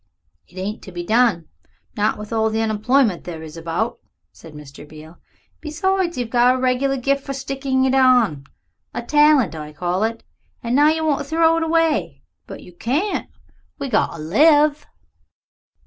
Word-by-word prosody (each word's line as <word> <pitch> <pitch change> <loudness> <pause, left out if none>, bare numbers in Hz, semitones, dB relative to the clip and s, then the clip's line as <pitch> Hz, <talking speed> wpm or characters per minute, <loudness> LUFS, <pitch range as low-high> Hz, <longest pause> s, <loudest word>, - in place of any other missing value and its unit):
"It 180 - -19
ain't 200 +3 -5
to 190 - -11
be 175 -1 -6
done 215 -5 +1 0.5
not 210 +1 0
with 210 +2 -8
all 220 0 +1
the 220 0 -2
unemployed 220 -1 +1
there 165 -2 -8
is 155 0 -10
about," 170 +9 -3 0.3
said 160 -2 -15
Mr. 150 0 -12
Beale. 155 +2 -14 0.4
"Besides, 350 +2 -1
you've 240 -2 -4
got 245 +1 +4
a - - -2
regular 260 +2 0
gift 275 +2 0
for 275 - -5
sticking 270 -1 -1
it 260 - +1
on 245 - +3 0.5
a 240 - -3
talent 295 - +3
I 150 -1 -8
call 180 +4 -2
it. 225 +1 -3 0.4
And 235 +1 -1
now 290 +2 +5
you 315 +1 +1
want 295 -3 +1
to 285 - -5
throw 325 +2 +2
it - - -1
away. 325 -1 0 0.2
But - - -10
you 180 - -15
can't. 295 - -2 0.5
We 275 - -5
got 215 - +1
to - - -9
live." 295 - +3
245 Hz, 175 wpm, -20 LUFS, 185-285 Hz, 0.5 s, now